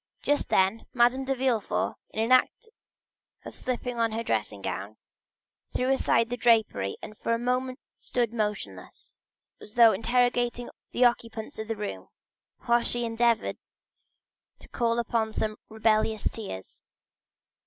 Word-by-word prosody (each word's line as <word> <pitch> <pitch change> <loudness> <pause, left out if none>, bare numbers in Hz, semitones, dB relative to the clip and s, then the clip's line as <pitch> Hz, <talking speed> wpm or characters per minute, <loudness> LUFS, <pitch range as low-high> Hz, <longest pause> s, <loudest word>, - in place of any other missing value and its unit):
Just 290 0 +1
then, 190 +4 +2
Madame 250 +2 +3
de 270 0 0
Villefort, 250 -5 0 0.2
in 220 +2 -1
the - - +6
act 255 - +3 0.8
of - - -8
slipping 250 -1 -3
on 230 -1 +1
her 225 +1 -2
dressing 105 - -2
gown, 100 +3 -4 0.8
threw 255 +1 +1
aside 235 -3 +2
the 245 - -1
drapery 220 - +2
and 215 - -8
for 230 +2 -1
a - - -1
moment 255 +2 -1 0.2
stood 240 -2 -1
motionless, 210 - -4 0.4
as 210 - -13
though 230 -2 +8
interrogating 245 +2 +1 0.2
the 250 - +3
occupants 230 -2 -1
of 220 - -4
the 225 - -2
room, 95 - -5 0.5
while 235 0 +3
she 240 0 +1
endeavored 230 0 +1 1.0
to - - -14
call 235 -1 0
up 235 - -4 0.2
some 215 -1 -1
rebellious 220 -1 +1
tears. 145 - -7
230 Hz, 140 wpm, -27 LUFS, 215-245 Hz, 1.0 s, though